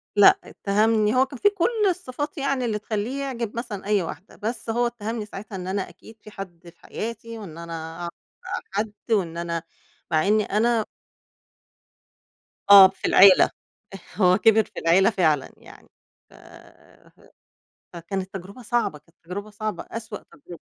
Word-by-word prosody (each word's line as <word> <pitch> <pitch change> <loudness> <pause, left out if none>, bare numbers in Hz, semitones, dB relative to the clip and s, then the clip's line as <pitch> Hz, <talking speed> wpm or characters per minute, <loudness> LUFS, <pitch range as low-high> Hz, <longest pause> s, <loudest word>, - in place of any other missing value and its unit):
لا 205 -1 +7
اتّهمني 215 +2 +1
هو 260 +1 +4
كان 270 -1 -11
فيه 410 - +5
كل 420 +2 0
الصفات 295 -4 -4
يعني 275 -2 -1
اللي 215 -3 -1
تخلّيه 220 +6 -3
يعجب 235 -5 -4
مثلًا 225 -5 -5
أي 205 -1 +2
واحدة، 185 +3 -8
بس 225 +2 -5
هو 240 +2 +1
اتّهمني 225 -1 -5
ساعتها 210 0 -9
إن 180 -1 -6
أنا 190 0 -2
أكيد 200 +5 -16
في 215 - -13
حد 175 -4 -10
في - - -22
حياتي، 230 +1 -6
وإن 185 -7 -9
أنا 165 -1 -7
أعرف 170 0 -4 0.3
بقى - - -4
حد 210 +2 -2 0.2
وإن 175 -6 +1
أنا 170 -1 -3 0.5
مع 160 +3 +2
إنّي 215 +1 +3
أنا 225 +1 +1 1.8
آه 195 -1 +11
في - - -8
العيلة، 195 -1 +7 0.7
هو 185 -2 +4
كِبِر 220 0 +5
في - - -9
العيلة 175 +5 +4
فعلًا 160 - +1
يعني - - -16 0.4
ف - - -21 1.6
فكانت 185 +3 -5
تجربة 195 +6 -9
صعبة، 235 -9 -1
كانت 165 +3 -31
تجربة 200 +5 -6
صعبة 215 +1 -4
أسوأ 220 -2 -6
تجربة. 165 +3 -13
210 Hz, 155 wpm, -24 LUFS, 185-230 Hz, 1.8 s, آه